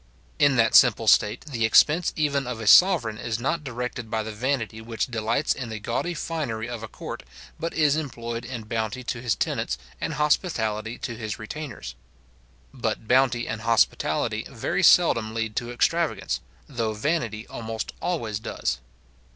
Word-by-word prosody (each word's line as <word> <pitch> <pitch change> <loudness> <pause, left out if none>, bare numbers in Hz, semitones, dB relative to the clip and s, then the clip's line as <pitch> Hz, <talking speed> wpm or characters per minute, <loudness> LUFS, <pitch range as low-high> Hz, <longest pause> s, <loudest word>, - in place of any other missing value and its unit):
In 140 -2 +5
that 115 -2 +3
simple 115 -2 +6
state, 105 +2 +4
the 125 -7 -3
expense 155 +9 +5
even 140 -4 0
of 125 -2 -4
a 110 - -5
sovereign 120 - +6
is 115 -3 -2
not 135 +7 -1
directed 125 -3 -5
by 110 -1 -1
the 110 - -5
vanity 115 -1 -2
which 115 0 -2
delights 115 +4 0
in 125 -3 -6
the 110 - -4
gaudy 170 +11 -2
finery 140 -9 -3
of 120 -2 -6
a 115 - -6
court, - - -7 0.4
but 165 +1 -2
is 150 -2 +3
employed 120 -6 -4
in 125 -4 -6
bounty 110 +2 -3
to 120 0 -4
his 120 -3 0
tenants, 60 - -1 0.2
and - - -2
hospitality 115 - 0
to 120 - -5
his 110 -2 -5
retainers. 115 - -7 0.8
But 110 - -3
bounty 125 -1 +3
and 110 -1 -4
hospitality 115 0 +1
very - - -2
seldom 110 -1 +5
lead 115 -1 -2
to 120 -2 -2
extravagance; 165 +7 0 0.3
though 115 -5 -2
vanity 115 -3 -1
almost 110 -1 -5
always 115 -13 -2
does. 110 - -3
120 Hz, 160 wpm, -25 LUFS, 110-140 Hz, 0.8 s, simple